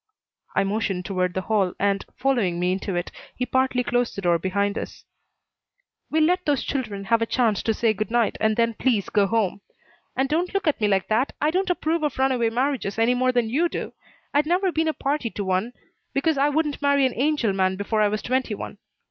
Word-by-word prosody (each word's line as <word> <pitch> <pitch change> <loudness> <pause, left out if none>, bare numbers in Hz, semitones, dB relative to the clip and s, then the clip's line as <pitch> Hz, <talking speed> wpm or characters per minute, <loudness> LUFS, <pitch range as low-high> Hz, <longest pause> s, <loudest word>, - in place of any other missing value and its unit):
I - - +3
motioned 195 -2 -1
toward 185 -2 -1
the 190 - 0
hall 195 -3 +1
and, 200 0 +1
following 235 -10 +1
me 180 +1 +1
into 190 0 -2
it, 175 0 -3 0.2
he 250 - -1
partly 260 0 +1
closed 245 0 0
the 200 - -4
door 170 -1 +3
behind 200 +3 0
us. - - -7 1.0
"We'll 315 0 +2
let 360 +3 +2
those 285 -3 +2
children 220 -8 -3
have 230 +3 +2
a 230 - +1
chance 225 -6 +1
to 225 - 0
say 225 -1 +2
good 215 +2 -3
night, 235 -1 +1
and 220 0 +2
then 230 0 +2
please 225 -4 0
go 205 -2 +3
home. 205 -3 0 0.5
And 265 +1 +1
don't 345 +7 -1
look 395 -3 0
at 290 -6 +1
me 210 - +3
like 195 -2 +1
that! 230 +5 +1
I 300 - +2
don't 375 +2 0
approve 335 -2 0
of 300 -3 -1
runaway 260 -3 +2
marriages 250 -4 -1
any 225 +2 +3
more 255 +1 +2
than 245 -2 +1
you 335 +7 +2
do. - - -5 0.4
I'd 295 +1 +2
never 365 +2 +2
be 320 -1 0
a 315 - +1
party 275 -3 -1
to 205 - -4
one, 190 +5 0 0.4
because 310 +3 +2
I 280 +1 +3
wouldn't 295 -1 -1
marry 280 -1 +3
an 255 - 0
angel 270 -6 +1
man 190 -1 +1
before 210 +2 -1
I 210 - +5
was 210 +1 -2
twenty 255 -3 0
one. 200 - -8
235 Hz, 220 wpm, -24 LUFS, 200-280 Hz, 1.0 s, I